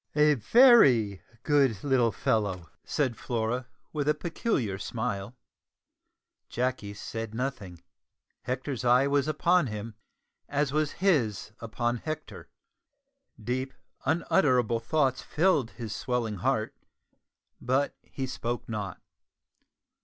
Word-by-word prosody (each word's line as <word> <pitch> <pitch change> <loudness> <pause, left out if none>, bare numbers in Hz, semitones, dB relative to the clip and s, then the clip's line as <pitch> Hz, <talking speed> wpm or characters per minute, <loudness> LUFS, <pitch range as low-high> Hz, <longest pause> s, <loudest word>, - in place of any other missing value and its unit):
"A 150 0 +5
very 125 - +5 0.2
good 135 -9 +2
little 130 -5 +3
fellow," 95 -4 -1
said 135 -6 -1
Flora, 120 +2 -2 0.3
with 150 -1 0
a 150 - +3
peculiar 145 - -2
smile. 110 -1 -4 1.1
Jacky 120 -5 -2
said 115 +1 -6
nothing. 115 -9 -4 0.6
Hector's 130 0 -3
eye 125 +2 +5
was 140 0 +1
upon 170 +1 +2
him, 105 0 -6 0.6
as 145 -1 0
was 155 -1 0
his 135 - +1
upon 120 +1 -2
Hector. 155 +4 -7 0.9
Deep 130 +4 -3 0.3
unutterable 130 - +2
thoughts 135 +1 +1
filled 155 -7 +1
his 115 -4 -6
swelling 120 -4 -2
heart, - - -1 0.9
but 130 +3 0
he 135 - -5
spoke 120 -2 -4
not. 105 -3 -4
125 Hz, 105 wpm, -28 LUFS, 110-145 Hz, 1.1 s, A